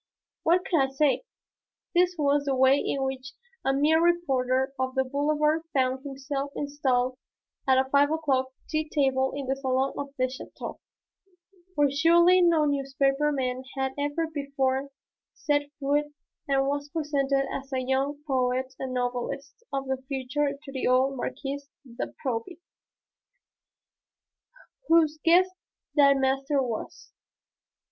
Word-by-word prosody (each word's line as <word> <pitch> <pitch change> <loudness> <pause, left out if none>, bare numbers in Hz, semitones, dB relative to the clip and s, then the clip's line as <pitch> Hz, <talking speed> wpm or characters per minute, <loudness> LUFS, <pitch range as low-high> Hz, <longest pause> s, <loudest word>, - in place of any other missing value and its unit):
What 355 +3 +2
could 335 - +2
I 270 -1 +2
say? 280 - +1 0.7
This 360 0 +3
was 285 -1 +2
the 275 -1 +1
way 265 +2 +5
in 275 - -1
which 265 +1 -4 0.3
a 270 - +2
mere 300 +4 +3
reporter 265 -6 +1
on 260 0 -1
the 265 - +3
Boulevard 300 +3 +1
found 260 -1 +1
himself 275 0 -4
installed 260 -3 0 0.5
at 260 -1 +5
a 265 0 +2
five 285 +1 +4
o'clock 280 -5 +1 0.2
tea 310 -1 -2
table 265 -3 +1
in 280 -1 -4
the 265 +1 0
salon 265 0 0
of 280 0 -4
a - - +2
château, 255 +1 -5 1.0
where 290 -2 +3
surely 340 +5 +5
no 335 -3 +4
newspaper 275 +1 +1
man 255 -2 -2 0.2
had 265 0 0
ever 290 +3 -1
before 280 -3 -1 0.5
set 290 -1 0
foot 290 +1 +1 0.4
and 270 -1 +2
was 285 +1 -2
presented 280 -3 0
as 275 +1 -6
a 260 -1 0
young 275 +2 -1
poet 260 -1 0
and 260 -1 -4
novelist 250 +3 -3 0.2
of 275 -1 -2
the 265 0 -2
future 280 +1 -1
to 275 - -9
the 265 -1 -2
old 260 +2 +3
Marquise 280 +2 -5 0.2
de 240 -2 -5 0.2
Proby, 250 +8 -3 2.3
whose 315 -2 +4
guest 360 +3 +5 0.4
the 280 -2 +6
master 270 +1 +1
was. 240 -5 -4
275 Hz, 140 wpm, -27 LUFS, 265-295 Hz, 2.3 s, the